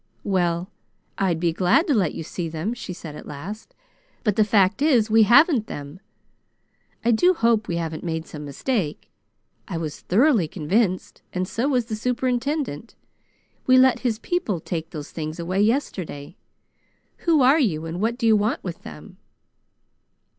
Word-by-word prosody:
"Well, 180 -1 0 0.5
I'd 180 -4 +1
be 170 -1 +1
glad 180 - +3
to 295 - +1
let 190 - +1
you - - -5
see 165 +1 -5
them," 165 +8 -3
she 240 - -7
said 160 -4 -8
at - - -10
last, 180 +10 -8 0.5
"but 210 -4 +1
the 215 - +4
fact 200 0 +2
is 245 -8 +3
we 225 +1 +6
haven't 245 - +5
them. 145 +4 -8 1.1
I 240 - +4
do 355 +12 +4
hope 230 -6 +2
we 170 - -2
haven't 165 -2 -4
made 160 -2 -3
some 150 -2 -9
mistake. 150 - -3 0.6
I 170 - -4
was 155 -3 -5
thoroughly 225 - +3
convinced, 185 +4 -1
and 185 0 -1
so 235 +8 -1
was 250 -5 +1
the 220 -2 -4
superintendent. 250 - -2 0.7
We 255 0 +6
let 260 0 +5
his 235 -4 -1
people 245 - -2
take 165 0 -5
those 150 -4 -8
things 155 +1 -5
away 185 +4 -1
yesterday. 190 - -2 0.8
Who 320 -5 +3
are 275 +5 +5
you, 165 - 0
and 165 +3 -5
what 230 +2 0
do 240 - -2
you 220 -1 +6
want 215 +8 0
with - - -6
them?" - - -11
205 Hz, 165 wpm, -23 LUFS, 165-240 Hz, 1.1 s, we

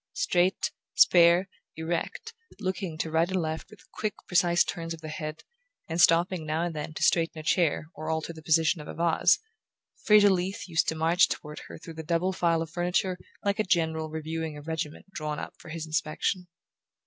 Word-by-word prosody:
Straight, 185 - +1 0.2
spare, 175 +2 +6 0.3
erect, 170 - -3 0.3
looking 185 -4 -3
to 160 0 -3
right 165 +2 +2
and 190 -1 0
left 160 -1 -3
with 200 -6 -17
quick 215 -2 -3
precise 175 -1 +4
turns 165 -1 -4
of 160 - -17
the 155 - -7
head, 155 0 -6 0.4
and 165 +1 0
stopping 175 0 +4
now 155 +2 -1
and 175 -1 -2
then 155 +1 -5
to - - -2
straighten 165 -1 +2
a 155 - -6
chair 160 -2 +2
or 155 +1 -6
alter 160 +1 -2
the 160 - -11
position 160 0 +2
of 150 - -10
a - - -7
vase, 170 0 +3 0.7
Fraser 210 -1 +6
Leath 185 +1 -2
used 165 -2 +1
to 160 - 0
march 165 +3 +4
toward 150 0 -5
her - - -9
through 165 0 -10
the 160 - -6
double 170 +4 0
file 170 -3 +1
of 165 - -10
furniture 180 +1 0 0.3
like 200 +1 +1
a - - +4
general 160 -4 0
reviewing 160 0 -4
a - - -8
regiment 160 -1 -4
drawn 150 -4 -4
up - - -6
for - - -12
his 160 0 -5
inspection. 160 +4 -1
165 Hz, 195 wpm, -28 LUFS, 160-180 Hz, 0.7 s, spare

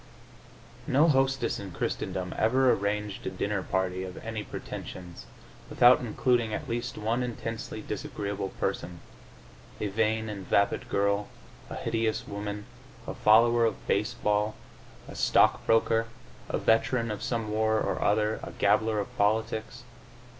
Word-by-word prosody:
No 145 +5 +4
hostess 135 -4 +2
in 100 -3 -7
Christendom 90 +2 -3
ever 130 +3 +4
arranged 105 0 -2
a - - +1
dinner - - -2
party 95 0 -1
of 95 0 -7
any 110 -1 -4
pretensions 90 -3 -8 0.4
without 125 +1 +6
including 120 -1 +1
at 150 - -6
least 120 +1 -3
one 115 +3 0
intensely 115 -2 -5
disagreeable 100 -1 -4
person 85 -2 -4 0.8
a 105 - -1
vain 110 +2 0
and 100 -4 -6
vapid 100 +5 +1
girl, 100 -1 +1 0.4
a - - -6
hideous 115 -1 -1
woman, 105 0 -5 0.4
a - - -4
follower 115 +2 +5
of 115 -3 -1
baseball, 105 0 0 0.5
a - - -9
stock - - +3
broker, 115 0 +3 0.4
a - - 0
veteran 115 +1 +2
of 105 - -5
some 115 -3 -2
war 110 0 +2
or - - -1
other, 105 +1 +2
a - - -8
gabbler 110 +1 +2
of 100 - -5
politics. 110 +3 0
110 Hz, 135 wpm, -28 LUFS, 100-115 Hz, 0.8 s, without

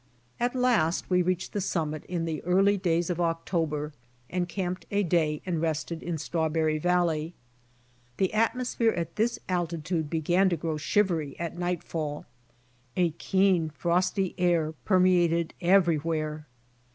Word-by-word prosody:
At 245 +2 0
last 230 -11 +1
we 180 0 +4
reached 185 0 -1
the 205 - -1
summit 155 -5 -2
in 175 -2 -2
the 160 -2 -3
early 195 +3 +4
days 175 -2 0
of 175 0 -2
October 165 -3 -1 0.4
and 180 0 -1
camped 185 0 -3
a 205 0 +1
day 160 -4 +1
and 170 -4 -1
rested 160 +1 -2
in 170 -2 -3
Strawberry 160 0 0
valley. 170 -1 +1 0.8
The 190 0 +1
atmosphere 230 +1 +1
at 170 -1 -4
this 235 +2 +1
alti 175 -2 -1
tude 160 -1 -2
began 175 +4 +2
to 170 - 0
grow 160 0 -2
shivery 160 -4 0
at 170 -1 -4
nightfall. 170 -4 -3 0.7
A 175 -2 +3
keen, 185 0 +2
frosty 180 +4 0
air 170 -3 +2
permeated 175 -3 +3
everywhere. 160 -4 +1
170 Hz, 140 wpm, -28 LUFS, 160-185 Hz, 0.8 s, we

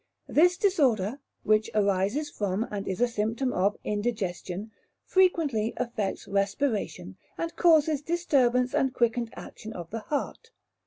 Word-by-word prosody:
This 355 +3 +4
disorder, 270 - +2 0.2
which 215 +1 +2
arises 200 +8 +1
from, 205 -4 -2
and 205 -1 -4
is 190 +3 -3
a 245 - +5
symptom 230 +3 -1
of, 200 +3 +1
indigestion, 205 -2 -3 0.3
frequently 310 - +2
affects 220 -5 -3
respiration, 200 - -1 0.2
and 335 0 -4
causes 315 -4 +4
disturbance 265 -7 +2
and 270 -3 +1
quickened 235 0 +1
action 220 +1 -9
of 170 -4 -8
the 225 - -3
heart. 295 - -4
230 Hz, 125 wpm, -27 LUFS, 205-290 Hz, 0.3 s, a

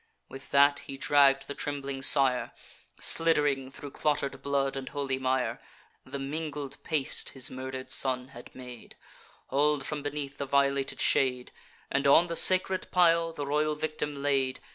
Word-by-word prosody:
With 135 0 -11
that 140 0 +4
he 135 - -7
dragg'd 140 -1 +3
the 140 - -4
trembling 140 -2 -4
sire, 135 -2 +3 0.5
Slidd'ring 145 -5 +3
thro' 140 +1 -10
clotter'd 140 -3 -2
blood 140 -1 -1
and 135 -1 -6
holy 135 -2 -3
mire, 130 -1 -1 0.5
(The - - -6
mingled 145 0 -6
paste 150 -4 0
his 130 - 0
murder'd 130 0 -7
son 130 -1 0
had 120 -2 -14
made,) 125 -2 -11 0.5
Haul'd 145 +1 +1
from 150 -1 -4
beneath 145 -1 -6
the 140 - -4
violated 140 0 0
shade, 125 -2 +1 0.4
And 140 +1 0
on 160 +5 +6
the 170 -1 -5
sacred 185 +1 +3
pile 170 -2 +3
the 145 -3 -6
royal 150 +2 0
victim 150 -2 -4
laid. 135 -2 0
140 Hz, 150 wpm, -28 LUFS, 135-150 Hz, 0.5 s, on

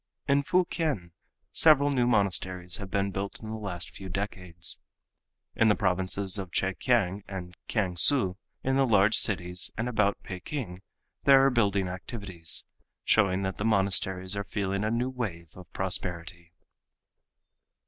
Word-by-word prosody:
In 140 0 +4
Fukien 155 - 0 0.4
several 145 -2 +5
new 125 -3 +2
monasteries 95 -5 0
have 100 -2 -7
been 100 +1 0
built 100 +1 -4
in 110 -1 -7
the - - -3
last 95 -5 -5
few 95 -1 -9
decades. 90 -3 -3 0.7
In 115 - +4
the 105 - +5
provinces 95 0 +1
of 95 -3 -6
Chekiang 95 0 +1
and 90 -3 -7
Kiangsu, 95 +1 +3 0.3
in 135 0 +1
the 135 -1 +3
large 105 -1 +4
cities 90 -4 -2
and 115 +2 -1
about 105 -4 +1
Peking 95 - -6 0.4
there 135 -1 +7
are 135 - +4
building 100 -5 +2
activities, 90 -2 -4 0.4
showing 95 -3 +3
that 95 0 -3
the - - -1
monasteries 95 -2 +1
are 100 - -2
feeling 100 0 -2
a 110 - +1
new 120 +3 0
wave 85 -11 -5
of 90 -1 -13
prosperity. 90 -2 -3
100 Hz, 140 wpm, -28 LUFS, 90-115 Hz, 0.7 s, there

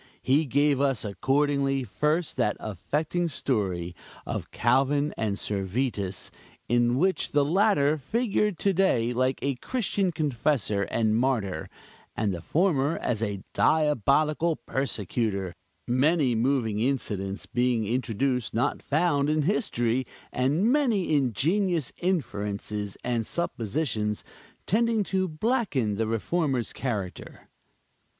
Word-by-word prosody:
He 145 +5 +3
gave 140 +1 +2
us, 135 -5 +1
accordingly, 135 +4 +1
first, 150 - -1
that 105 -5 +1
affecting 150 - -2
story 95 - -2 0.3
of - - -4
Calvin 140 +5 +2
and 105 -3 -1
Servetus, 100 -1 -2 0.4
in 120 +1 +2
which 185 +5 +1
the 145 -1 +4
latter 155 -4 +3
figured 210 - 0
to 200 +3 +1
day 125 -11 +2
like 130 +2 +1
a 140 -2 0
Christian 200 - -1
Confessor 130 - 0
and 110 -2 +1
martyr, 110 -9 0 0.5
and 105 -3 0
the 85 - -5
former 155 - +1
as 115 -3 -2
a 100 -4 -2
diabolical 155 +2 +2
persecutor; 105 - -2 0.3
many 135 +2 +3
moving 115 -3 +1
incidents 105 -7 -1
being 120 +1 +1
introduced 125 +1 -1
not 125 +5 0
found 145 -2 +1
in 155 0 +2
history, 130 - 0 0.3
and 150 - +2
many 235 - +2
ingenious 155 - +1
inferences 105 - -2
and 120 -2 0
suppositions 110 - -2 0.4
tending 225 0 +2
to 190 -1 0
blacken 160 - 0
the 115 0 0
Reformer's 130 +2 -1
character. 105 -8 -5
135 Hz, 115 wpm, -27 LUFS, 110-155 Hz, 0.5 s, the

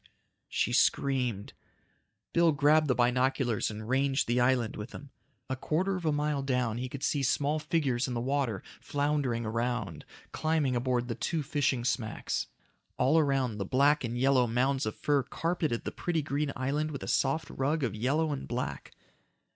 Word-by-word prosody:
She - - 0
screamed. 125 -7 +1 0.8
Bill 170 -2 +4
grabbed 150 +2 +4
the 125 - +2
binoculars 125 -1 +1
and 110 0 -7
ranged 135 +2 +1
the 120 +1 +2
island 125 -2 +2
with 105 +3 -6
them. 140 -1 -11 0.4
A 130 - -2
quarter 180 +8 0
of 180 -2 -5
a - - +3
mile 150 -1 0
down 125 -4 0
he 130 +1 -3
could 140 +1 -7
see 145 - +1
small 145 +3 +1
figures 145 -5 0
in 125 - -3
the - - -1
water, 130 -4 -1 0.2
floundering 140 -5 -1
around, 115 -6 -2 0.3
climbing 155 -5 0
aboard 120 0 0
the 120 - -2
two 155 +7 -2
fishing 135 -4 0
smacks. 115 -3 -2 0.5
All 140 +6 +4
around, 135 -7 +1
the - - 0
black 140 +8 +3
and 120 0 -3
yellow 130 -1 +3
mounds 130 +2 +1
of 110 - -3
fur 145 -2 +1
carpeted 160 -4 -2
the - - -2
pretty 165 -3 -2
green 140 +1 -1
island 145 +4 -1
with 140 -3 -6
a - - -6
soft 155 +4 0
rug 145 +3 0
of 115 -6 0
yellow 140 +8 0
and 140 - -5
black. 125 +1 -4
135 Hz, 170 wpm, -30 LUFS, 120-145 Hz, 0.8 s, Bill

